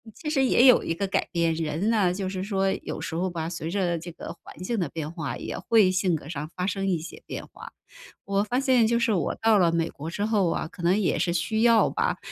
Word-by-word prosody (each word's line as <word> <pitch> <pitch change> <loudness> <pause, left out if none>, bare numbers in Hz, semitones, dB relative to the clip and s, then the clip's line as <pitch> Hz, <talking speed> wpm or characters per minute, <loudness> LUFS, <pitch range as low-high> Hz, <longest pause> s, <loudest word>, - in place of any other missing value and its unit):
其 310 - -9
实 270 -3 +2
也 250 0 +4
有 250 - +7
一 165 - -1
个 200 - -1
改 195 - 0
变， 170 -1 +1
人 160 +6 -1
呢， 205 -6 +3
就 190 0 -3
是 185 0 -3
说 195 -1 0
有 - - -5
时 - - -5
候 185 +2 0
吧， 165 -2 -4
随 165 -2 -5
着 180 -3 0
这 170 +2 -8
个 - - -8
环 - - -13
境 225 +3 -1
的 165 -6 -1
变 155 0 -5
化 150 -8 -4
也 - - -5
会 215 -5 +4
性 185 -2 +1
格 145 - -7
上 155 -1 -5
发 180 0 -2
生 195 0 -1
一 180 - +2
些 165 +2 -9
变 - - -6
化。 - - -12 0.5
我 200 +1 +1
发 245 +5 -1
现 255 -5 +3
就 235 - +2
是 235 -2 +2
我 170 -7 -1
到 220 -2 +3
了 170 -2 +4
美 165 0 0
国 155 +3 -7
之 205 +4 -2
后 210 -5 +2
啊， 160 - -2
可 175 - -12
能 180 +4 +3
也 195 - +1
是 175 - +1
需 180 +6 0
要 230 -1 +5
吧， - - 0
185 Hz, 280 characters per minute, -26 LUFS, 165-215 Hz, 0.5 s, 有